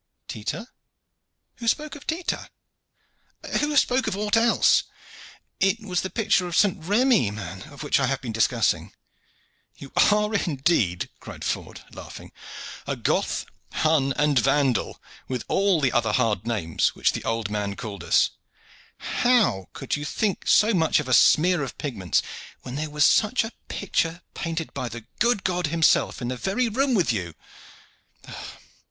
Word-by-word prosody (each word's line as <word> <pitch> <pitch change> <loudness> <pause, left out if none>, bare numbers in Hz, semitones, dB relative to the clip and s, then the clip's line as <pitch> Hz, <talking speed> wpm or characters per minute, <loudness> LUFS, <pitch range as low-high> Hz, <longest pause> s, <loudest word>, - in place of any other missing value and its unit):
"Tita! 120 - -5 0.9
Who 235 - -6
spoke 300 +6 0
of 290 - -13
Tita?" 330 +2 -3 1.1
"Who 295 0 0
spoke 260 -1 +3
of 190 - -2
aught 210 +1 +1
else?" 230 0 +4 0.7
"It 195 +3 +2
was 185 -5 -2
the 190 - -4
picture 195 -5 +1
of 170 - -2
St. 190 -5 +2
Remi, 215 - +3
man, 100 -3 -7
of 145 +1 -9
which 145 - +2
I 135 - +1
have 135 +1 -1
been 120 -4 -6
discoursing." 110 -1 +1 0.8
"You 135 - -11 0.2
are 210 +1 +1
indeed," 140 - 0
cried - - -10
Ford, - - -4
laughing, - - -10 0.6
"a - - -1
Goth, - - -1 0.3
Hun, 155 -4 +2
and 145 -2 +3
Vandal, 130 -1 +1 0.3
with 125 -2 -3
all 195 -3 +2
the 135 -4 +2
other 115 -4 +1
hard 110 -4 +1
names 95 -9 0
which - - +2
the - - -5
old 115 -2 -2
man 100 -1 -2
called 100 -5 -7
us. - - +3 0.7
How 230 - +1
could 135 - -3
you 145 - -5
think 200 +6 -2
so 220 +2 +5
much 160 -5 +3
of 150 - -4
a 130 - 0
smear 170 +6 +5
of 135 - -5
pigments, 100 - -1 0.4
when 125 - -7
there 150 +3 -3
was 150 0 +3
such 220 +3 +3
a 225 - -6 0.2
picture 170 -3 -2
painted 165 -1 -4
by 125 - -4
the 115 0 -9
good 235 -5 +2
God 180 -3 0
himself 160 -4 +2
in 120 - -2
the 130 - -3
very 225 - 0
room 260 +3 +1
with 170 - +2
you? 90 -6 -4
155 Hz, 160 wpm, -24 LUFS, -, 1.1 s, so